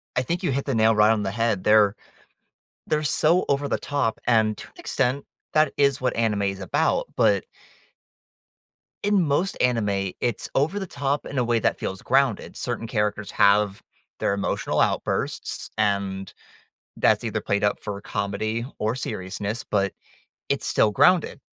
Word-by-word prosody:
I 125 - +1
think 170 +6 -3
you - - +1
hit 135 +1 -1
the 135 - -1
nail 110 0 +4
right 105 +1 +5
on 110 -2 +1
the 95 - -2
head 115 -3 0
there. 105 -1 +5 0.9
They're 155 0 0
so 155 +4 +3
over 140 0 +1
the - - 0
top, 140 -6 -1
and 110 -3 +3
to - - -9
an - - -26
extent, 135 +2 -1 0.3
that 155 -2 +3
is 140 -2 +3
what 130 0 0
anime 110 -3 +1
is 95 -1 -2
about, 95 - 0
but - - +3 1.6
in 205 -1 +3
most 165 +6 0
anime, 105 -6 +1
it's 120 -4 -1
over 150 +8 +1
the 195 - -3
top 140 -3 -2
in 140 - -6
a 125 - +2
way 120 0 +1
that - - 0
feels 95 - -4
grounded. 135 -5 +1
Certain 120 -2 -4
characters 105 -2 -2
have 100 0 +3 0.4
their - - +1
emotional 100 - -1
outbursts, - - -1
and 100 -2 -1 0.7
that's - - +3
either - - -2
played 100 0 -1
up 105 - +1
for 105 -2 -5
comedy 110 +3 -2
or 110 +2 0
seriousness, 105 -2 -4
but 100 -2 0 0.6
it's - - -1
still 105 - +3
grounded. 175 - +3
110 Hz, 165 wpm, -24 LUFS, 100-140 Hz, 1.6 s, right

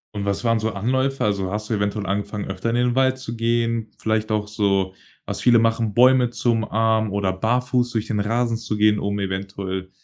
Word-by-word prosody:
Und 100 - -3
was 100 +3 -2
waren 115 -1 +3
so 110 +1 -1
Anläufe? 130 +7 0
Also, 100 -3 -1
hast 105 +1 -4
du - - 0
eventuell 100 0 -1
angefangen, 100 +1 -3
öfter 95 +4 -3
in 115 - 0
den 125 0 +1
Wald 130 0 +2
zu 120 -3 -6
gehen? 115 -1 0
Vielleicht 110 0 -1
auch 105 -1 0
so, 100 -2 0 0.3
was - - -3
viele 120 -2 +5
machen: 115 -1 +1
Bäume 125 +1 +5
zu 120 0 0
umarmen 110 -1 +1
oder 100 -2 0
barfuß 125 +4 0
durch 110 -2 -2
den 105 -2 -1
Rasen 115 +2 0
zu 110 -2 -4
gehen, 105 0 +4
um 100 0 -2
eventuell, 95 -1 -4
110 Hz, 205 wpm, -22 LUFS, 100-115 Hz, 0.3 s, viele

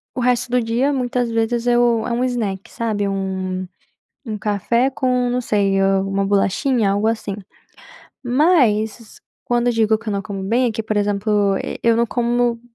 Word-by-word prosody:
o - - -3
resto 245 0 +1
do 250 0 +2
dia 235 +5 0
muitas 250 -3 -1
vezes 230 +1 -1
eu 240 -2 +3
é - - -3
um 240 +1 0
snack, 220 -7 -3
sabe, 215 -3 -2
um 190 -1 -3 0.6
um 215 -3 -4
café 215 +5 0
com 250 -2 0
não 245 +1 0
sei, 200 -4 +1
alguma 195 0 +1
bolachinha, 205 +3 +1
algo 205 +2 +1
assim. 220 -3 -2 0.9
Mas 240 - +1 0.2
quando 240 0 +1
digo 220 -1 +2
que 225 0 -9
eu - - -1
não 200 - -2
como 200 -2 -6
bem, 235 +6 +2
é - - +1
que 225 - -3
por 215 -1 -3
exemplo, 205 -1 +1 0.3
eu 230 -1 +3
não 235 0 +2
como 240 0 0
225 Hz, 170 wpm, -20 LUFS, 200-245 Hz, 0.9 s, eu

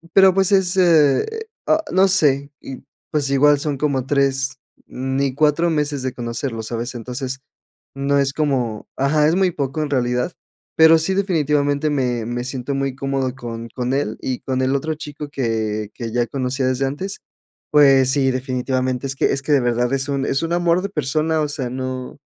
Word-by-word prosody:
pero, 190 -1 +7
pues 195 +1 +2
es, 190 -2 +2
eh, 160 -7 +4 0.4
ah 315 +1 +2
no 190 +2 +4
sé 145 -7 +2
y, 135 - -9 0.3
pues, 145 -3 0
igual 145 +1 +4
son 145 -1 -2
como 135 -3 0
3, 135 -2 0 0.3
ni 135 +1 -2
4 155 +4 +2
meses 145 -3 -1
de 130 -1 -2
conocerlo, 115 -1 -4
¿sabes?, 115 +2 -4
entonces 125 +3 -5 0.6
no 140 +1 +1
es 135 0 +1
como 130 -8 -1
ajá, 150 +2 +3
es 165 - +2
muy 190 -1 +3
poco 140 -1 -3
en 150 - -4
realidad, 125 +2 0 0.4
pero 160 0 +7
sí, 175 +4 0
definitivamente 150 -6 +1
me 125 -5 -1
me 120 +1 -3
siento 130 +1 -4
muy 135 -1 -2
cómodo 135 -1 -2
con 115 -2 -7
con 125 +2 -3
él 135 -6 -1
y 130 -2 -3
con 130 -1 -2
el 130 +1 +1
otro 155 +3 -2
chico 150 -1 -8
que 110 -5 -2
que 115 -2 -5
ya 120 0 +1
conocía 130 0 -2
desde 130 +1 0
antes. 190 +9 -5 0.5
Pues 135 -3 +6
sí, 135 -2 +2
definitivamente 130 0 -2
es 135 - -4
que - - +1
es 135 - -2
que 150 - -2
de 140 - +5
verdad 120 +1 0
es 135 +1 -1
un 140 -1 -1
es 135 - 0
un 165 +1 -1
amor 175 0 +2
de 200 - -2
persona, 155 -1 0
o 150 - 0
sea, 135 -4 -3
no 130 0 -5
135 Hz, 190 wpm, -20 LUFS, 130-150 Hz, 0.6 s, pero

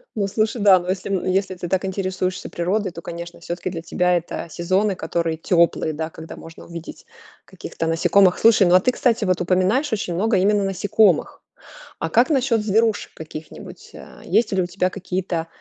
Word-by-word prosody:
Ну 200 -2 0
слушай, 215 +2 -1
да, 195 -3 +6
ну 175 - -9
если, 190 +1 -3
м, 190 - -1
если 190 0 0
ты 175 0 -6
так 190 0 0
интересуешься 185 -1 -3
природой, 185 +3 -1
то, 170 - -9
конечно, 170 0 -8
всё-таки 175 +2 -5
для 165 -2 -6
тебя 180 +1 +1
это 170 0 -5
сезоны, 185 +5 0
которые 165 -2 -2
теплые, 170 -2 +1
да, 160 +1 -4
когда 160 0 -10
можно 165 0 -12
увидеть 170 -1 -10 0.4
каких-то 165 - -6
насекомых. 180 +3 +3
Слушай, 220 -4 +5
ну, 175 - +5
а 185 - +8
ты, 250 - +1
кстати, 235 -4 +1
вот 185 -2 0
упоминаешь 190 - +1
очень 180 -5 -2
много 210 +2 +1
именно 205 +2 +2
насекомых. 195 -1 +1 0.6
А 160 - -2
как 240 - +3
насчет 250 -6 +2
зверушек 220 +1 +1
каких-нибудь? 155 0 -10
А - - -13
есть 225 -3 +1
ли 190 - +1
у 180 - 0
тебя 185 +1 -1
какие-то 180 -3 -3
185 Hz, 185 wpm, -21 LUFS, 170-205 Hz, 0.6 s, а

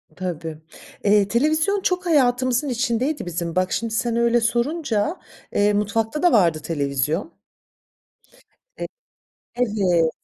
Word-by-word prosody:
Tabii, 165 -3 -5 0.5
eee, 205 -1 +4
televizyon 310 - +1
çok 365 0 0
hayatımızın 255 -3 +2
içindeydi 250 +3 -1
bizim. 170 -1 -4
Bak, 185 0 +1
şimdi 230 -1 -2
sen 230 +1 0
öyle 235 0 +3
sorunca, 240 - 0 0.3
eee, 205 0 +3
mutfakta 220 - -1
da 355 - +5
vardı 170 -7 +3
televizyon. 150 - -2 1.4
E - - -4 0.7
Evet. 195 -9 +2
225 Hz, 110 wpm, -22 LUFS, 185-260 Hz, 1.4 s, da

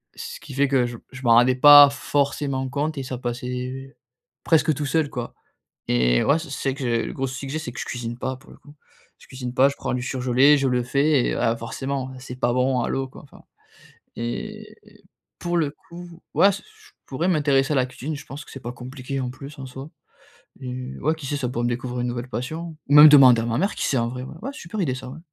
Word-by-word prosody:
ce - - -8
qui - - -10
fait 140 +2 +2
que 130 -2 +2
je 120 0 -5
m - - -20
je 130 - -10
m'en 120 -3 +2
rendais 125 +2 +5
pas 145 +2 +9
forcément 140 -1 -1
compte 145 +3 -2
et 135 - -3
ça 130 -1 -5
passait 125 +2 -5 0.5
presque 160 -1 +3
tout 145 +1 -4
seul 155 +1 0
quoi 120 -3 -6 0.6
et - - +3
ouais, 145 - +3
c 165 - -8
c'est 135 - -3
vrai - - -6
que 135 - -5 0.2
le - - -6
gros 135 - -2
soucis 135 +1 -6
que - - -5
j'ai, 155 - -2
c'est 140 -6 -6
que - - -7
je - - -3
cuisine 120 -1 -5
pas 130 +1 -3
pour 130 - -18
le - - -14
coup. 145 - -17 0.5
Je - - -18
cuisine 125 -2 -6
pas, 135 +2 +5
je 140 - -5
prends - - -3
du 125 - -2
surgelé, 130 +3 +3
je 135 -1 +1
le 125 -1 +1
fais 140 +1 +2
et - - 0
heu, - - -3
ah 115 - +1
forcément, 130 +3 -4
heu, - - -11
c'est 125 -1 -8
pas 120 -1 +1
bon 125 +1 +1
à - - -2
l'eau 135 0 -2
quoi. - - -14
Enfin. 140 - -17 0.7
Et 120 +1 -6 0.6
pour 175 0 -1
le 155 -4 0
coup, 175 +2 -13
ouais, 200 - +6
s 200 - -3
je 435 0 -21 0.2
je - - -3
pourrais 165 +7 0
m'intéresser 145 -5 +2
à - - 0
la 130 -2 +2
cuisine, 145 +4 -6
je 145 - -10
pense 140 +2 -8
que - - -14
c'est 135 - -8
pas 120 - -5
compliqué 130 +2 -6
en 125 -1 -2
plus 140 +3 -11
en 135 - -6
soi. 135 +3 -9 0.7
Et 130 0 -6
ouais, 155 +3 0
qui 160 -3 -9
sait 145 +2 -2
ça 135 -3 -2
pourrait 120 -1 -3
me - - +1
découvrir 125 +1 -3
une 125 - -1
nouvelle 120 +1 -4
passion, 160 +7 -5
ou - - +2
même 150 +1 +11
demander 130 -5 +7
à - - -3
ma 115 0 -1
mère 195 +8 0
qui - - -2
sait 135 - +1
en 115 -1 +1
vrai 125 +1 -6
ouais, 135 - -9
ouais 270 - -4
super 210 - -6
idée 140 -8 0
ça 130 0 -8
ouais. 140 +5 -9
135 Hz, 260 wpm, -23 LUFS, 125-145 Hz, 0.7 s, même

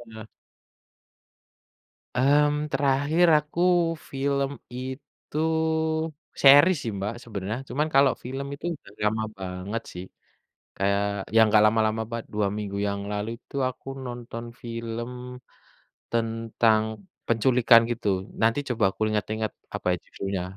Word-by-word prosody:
Ah. 110 0 -9 1.9
Mmm 150 +3 +3
terakhir 145 +5 +2
aku 150 +3 -8 0.5
film 140 0 0 0.3
itu 130 +3 -8 1.0
series 145 +6 +8
sih 115 - -2
Mbak 100 +3 -2
sebenarnya. 105 0 -4
Cuman 150 +5 0
kalau 135 -1 +6
film 135 +3 -4
itu 140 +3 -8
udah 120 - -17
lama 110 +1 +1
banget 95 +4 -4
sih. 90 +1 -7 0.7
Kayak 100 +1 +1 0.3
ya - - +7
enggak 105 0 +5
lama-lama 110 0 +2
banget, 115 -1 -4
2 105 -1 +1
minggu 100 -1 -4
yang 100 0 -2
lalu 105 +1 -2
itu 125 - -16
aku 130 +1 -13 0.2
nonton 120 -1 -6 0.2
film 115 0 -5 1.0
tentang 115 -1 +2 0.4
penculikan 120 0 +5
gitu. 115 -3 -2 0.3
Nanti 115 +3 +3
coba 120 -4 0
aku - - -20
inget-inget 110 0 -2 0.2
apa - - -11
ya - - +1
judulnya, 95 -2 -4
115 Hz, 120 wpm, -26 LUFS, 105-135 Hz, 1.9 s, series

